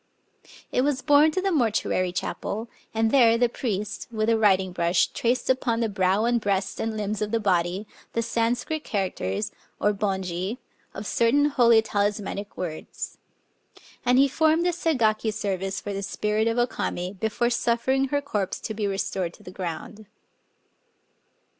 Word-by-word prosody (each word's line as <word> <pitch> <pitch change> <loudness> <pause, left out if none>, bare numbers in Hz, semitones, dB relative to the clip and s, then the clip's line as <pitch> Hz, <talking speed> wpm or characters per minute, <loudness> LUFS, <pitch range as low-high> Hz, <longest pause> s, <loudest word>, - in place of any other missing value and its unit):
^ - - -21 0.2
It 250 - +2
was 265 -1 0
borne 290 +2 +6
to 345 +4 -1
the 390 - +1
mortuary 220 - +1
chapel; 215 +4 -3 0.2
and 225 0 +1
there 230 -4 +6
the 245 +1 +4
priest, 210 -4 -3
with 215 -1 0
a 230 - +4
writing 190 -3 +3
brush, 170 0 +2
traced 245 +1 -1
upon 250 -3 +1
the 230 -2 +1
brow 195 +1 +2
and 240 -1 +2
breast 195 -2 -1
and 220 -1 -2
limbs 210 0 -2
of 210 - 0
the 230 +1 +1
body 185 -1 +1 0.3
the 230 - 0
San 230 +1 +1
scrit 315 +4 -4
characters 185 - -2 0.3
(Bonji) 195 0 -1 0.4
of 200 - -6
certain 235 +8 +3
holy 235 -5 +5
talismanic 205 -1 -2
words. 165 -4 -6 0.8
And 250 +1 +3
he 275 +1 +6
performed 315 +4 +2
a 355 - +3
Segaki 230 -10 +1
service 195 -3 -2
for 205 - -5
the 195 - -3
spirit 210 +2 0
of 230 +1 0
O 240 - +4
Kame, 180 -6 -3
before 230 +3 0
suffering 240 +3 +1
her 285 +1 -1
corpse 205 -9 -2
to 220 - -4
be 210 -1 -1
restored 190 -3 -2
to - - -19
the 180 - -9
ground. 185 +4 -6
215 Hz, 165 wpm, -25 LUFS, 195-240 Hz, 0.8 s, borne